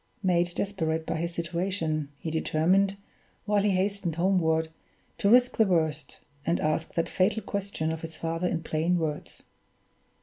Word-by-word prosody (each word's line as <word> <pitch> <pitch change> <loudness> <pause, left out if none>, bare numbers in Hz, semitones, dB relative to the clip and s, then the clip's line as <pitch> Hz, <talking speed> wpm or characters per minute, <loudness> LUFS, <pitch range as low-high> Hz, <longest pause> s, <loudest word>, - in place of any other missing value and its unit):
Made 175 -1 +2
desperate 160 -5 -1
by - - -2
his 170 +1 -2
situation, 170 -3 -2
he 160 - -5
determined, 185 +5 +2 0.5
while 205 -1 +2
he 205 - +2
hastened 190 -3 0
homeward, 165 -3 +2 0.5
to 200 - +3
risk 250 +2 +5
the 220 - +5
worst, 160 -5 -1 0.2
and 170 +3 +1
ask 155 +1 -1
that 165 - +1
fatal 200 +3 +1
question 200 -6 -2
of 160 0 -4
his 160 -1 -7
father 165 +2 -2
in 165 -2 -2
plain 160 +3 +1
words. 155 -3 -4
170 Hz, 155 wpm, -28 LUFS, 160-195 Hz, 0.5 s, risk